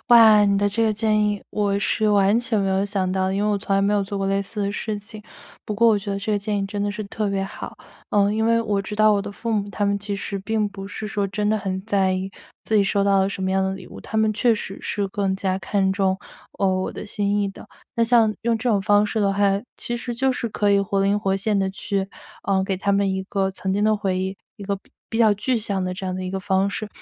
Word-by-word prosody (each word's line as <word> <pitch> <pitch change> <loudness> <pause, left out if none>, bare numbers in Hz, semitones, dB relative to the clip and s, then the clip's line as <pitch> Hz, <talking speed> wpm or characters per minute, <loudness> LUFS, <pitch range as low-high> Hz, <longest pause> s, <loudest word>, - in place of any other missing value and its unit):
哇， 220 -3 +8
你 200 0 +3
的 205 - +2
这 205 +3 0
个 220 - +3
建 215 0 +2
议 205 -1 0
我 200 -1 0
是 215 +2 +1
完 205 +2 +4
全 240 -3 -1
没 195 -1 +1
有 190 0 +2
想 195 -2 -1
到 190 0 +1
的， 190 - -1
因 200 - 0
为 210 - +2
我 205 - +1
从 195 0 0
来 195 - +2
没 200 +1 +2
有 205 -1 +2
做 200 +1 -5
过 195 0 -1
类 195 0 +1
似 205 +1 -4
的 200 - -1
事 210 +1 -3
情。 215 +1 -10 0.4
不 210 - -2
过 230 +3 +4
我 220 -2 +5
觉 200 0 -6
得 195 - -1
这 215 +2 -2
个 205 - +2
建 205 +1 -2
议 195 - -1
真 200 0 -3
的 205 - 0
是 215 +1 -5
特 205 +1 -2
别 195 -1 -1
好， 195 - -8 0.3
呃， 205 0 +3
因 220 +1 +1
为 230 0 +3
我 205 -3 0
知 210 +1 -6
道 215 0 +5
我 200 - +2
的 200 - -6
父 230 +3 -3
母 205 -2 0
他 205 0 -2
们 200 0 +1
其 200 0 -4
实 200 0 -4
并 215 +2 0
不 195 -1 -8
是 215 +1 -5
说 205 0 -1
真 210 +2 -1
的 215 - +2
很 190 -1 -4
在 195 -3 +2
意 190 +1 -3 0.3
自 220 - -1
己 205 - +5
收 200 0 +1
到 200 -1 +4
了 190 - +2
什 195 -1 -4
么 190 - 0
样 190 0 +2
的 190 0 -1
礼 185 -2 -10
物， - - -11
他 220 - -6
们 220 0 +3
确 230 +2 +3
实 195 -2 -6
是 200 -1 -2
更 190 -1 -1
加 190 -1 -1
看 190 0 0
重， 190 -1 +1 0.4
呃， 195 - +2 0.2
我 - - -3
的 - - -7
心 205 -1 -1
意 200 - 0
的。 195 - -11 0.3
那 235 - +1
像 230 -2 +4
用 230 -1 +1
这 245 +2 -1
种 205 -3 +2
方 205 +1 +4
式 215 +1 -1
的 200 -1 +3
话， 200 -1 +2 0.2
其 240 - -3
实 240 0 -4
就 260 +2 +1
是 245 -2 -2
可 205 -1 +1
以 200 0 +4
活 195 0 -1
灵 200 +1 +2
活 195 -2 +1
现 205 +1 0
地 195 -1 +1
去， 195 0 -3 0.4
呃， 190 -1 +1
给 190 0 -1
他 200 +1 0
们 200 0 +2
一 190 - -2
个 195 -1 -1
曾 190 0 -4
经 205 +2 +1
的 215 - +4
回 195 -3 -1
忆， 190 +1 -2 0.2
一 205 - -10
个 200 0 -1
比 195 - -23 0.2
比 225 - -3
较 220 -2 +5
具 250 +5 0
象 200 -4 -2
的 185 - -3
这 190 +1 -7
样 185 - -2
的 185 - -4
一 185 - -4
个 195 - -2
方 190 +1 +1
式， 215 +1 -4
200 Hz, 315 characters per minute, -23 LUFS, 195-215 Hz, 0.4 s, 哇